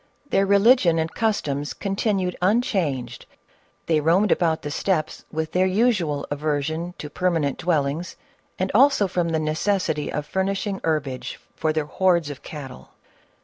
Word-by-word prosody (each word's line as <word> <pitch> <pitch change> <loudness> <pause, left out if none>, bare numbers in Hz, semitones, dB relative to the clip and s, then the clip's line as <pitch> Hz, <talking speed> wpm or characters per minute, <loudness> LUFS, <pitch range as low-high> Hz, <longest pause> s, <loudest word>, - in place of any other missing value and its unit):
Their 195 0 +3
religion 200 -3 +5
and 160 0 -1
customs 145 - -1
continued 195 -2 -1
un 210 +7 +3
changed; 150 - -2 0.6
they 160 -2 +2
roamed 175 +7 +3
about 160 -2 +1
the 145 - -4
steppes 160 -1 -1
with 160 0 -3
their 185 +1 +2
usual 185 -8 +1
aversion 155 +4 -2
to 150 - -6
permanent 160 -3 -1
dwellings, 160 0 -1 0.4
and 185 +1 -1
also 260 -3 +5
from 175 -2 -1
the 160 - 0
necessity 155 0 -1
of 150 - -3
furnishing 195 +3 -2
herbage 145 -5 -2 0.2
for 155 0 0
their 155 -1 -1
hordes 170 -2 +1
of 140 - -9
cattle. 135 -5 -9
170 Hz, 145 wpm, -23 LUFS, 150-195 Hz, 0.6 s, religion